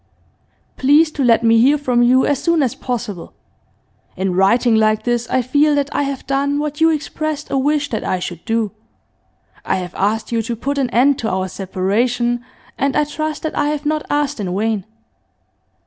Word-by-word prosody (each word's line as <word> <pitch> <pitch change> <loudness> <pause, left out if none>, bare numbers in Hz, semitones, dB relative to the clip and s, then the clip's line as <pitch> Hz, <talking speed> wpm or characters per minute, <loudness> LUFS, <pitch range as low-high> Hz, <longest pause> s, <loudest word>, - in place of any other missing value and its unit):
'Please 295 +4 +4
to 285 - -2
let 235 -1 +4
me 225 0 +5
hear 280 +5 +4
from 250 -4 +1
you 255 +2 +4
as 285 -2 0
soon 335 -3 +2
as 250 - 0
possible. 235 -8 -5 0.8
In 190 0 -1
writing 225 +6 +3
like 215 0 +2
this 240 0 -1
I 260 -1 +1
feel 290 +4 +2
that 285 0 -1
I - - +2
have 275 -2 -3
done 280 +1 0
what 295 +1 -3
you 325 - +6
expressed 310 -1 -3
a - - +1
wish 290 +1 0
that 220 - -2
I 185 - -1
should 175 -2 -6
do. 225 -3 -1 0.9
I - - 0
have 180 -1 -5
asked 215 +4 -1
you 230 -1 +1
to 235 +1 -4
put 280 +5 -3
an 260 -3 0
end 260 +4 +3
to 220 - -2
our 185 0 -1
separation, 230 +7 -1 0.4
and 275 0 0
I - - +3
trust 310 +1 -4
that 315 - -3
I - - +1
have 295 0 -2
not 305 0 0
asked 290 -2 -1
in 185 -2 -3
vain. 215 -2 -1
250 Hz, 195 wpm, -18 LUFS, 220-290 Hz, 0.9 s, you